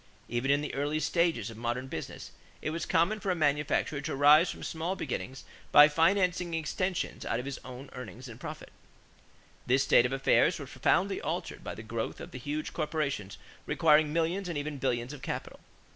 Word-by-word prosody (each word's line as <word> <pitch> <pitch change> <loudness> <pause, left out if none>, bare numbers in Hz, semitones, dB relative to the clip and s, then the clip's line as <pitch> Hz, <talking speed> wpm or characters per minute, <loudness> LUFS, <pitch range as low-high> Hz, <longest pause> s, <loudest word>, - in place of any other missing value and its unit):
Even 120 +3 -1
in 140 +1 +4
the 150 - -4
early 145 +2 -1
stages 155 - +1
of 110 - -11
modern 120 +2 -2
business, 80 - -7 0.3
it 155 - -3
was 165 +1 -3
common 185 +5 +2
for 200 - -3
a 180 - +2
manufacturer 145 -1 +1
to 140 - -3
rise 150 +5 +6
from - - -6
small 165 +4 -2
beginnings 130 -4 -5 0.3
by 145 0 +10
financing 175 +2 +2
extensions 180 +3 -2
out 115 - -1
of 125 - -5
his 140 -1 -5
own 130 +2 -9
earnings 125 +1 -8
and 115 -1 -10
profits. - - -8 1.0
This 130 +2 +4
state 125 -3 +5
of - - -9
affairs 135 0 +3
was - - -8
profoundly - - +1
altered - - -4
by - - -5
the 110 - -8
growth 110 0 -4
of - - -9
the 125 - -7
huge 145 +4 -4
corporations 150 - -2 0.3
requiring 155 -1 +4
millions 170 +4 0
and 170 - -3
even 145 0 -4
billions 125 0 -1
of 145 - -10
capital. - - -5
145 Hz, 190 wpm, -30 LUFS, 125-165 Hz, 1.0 s, by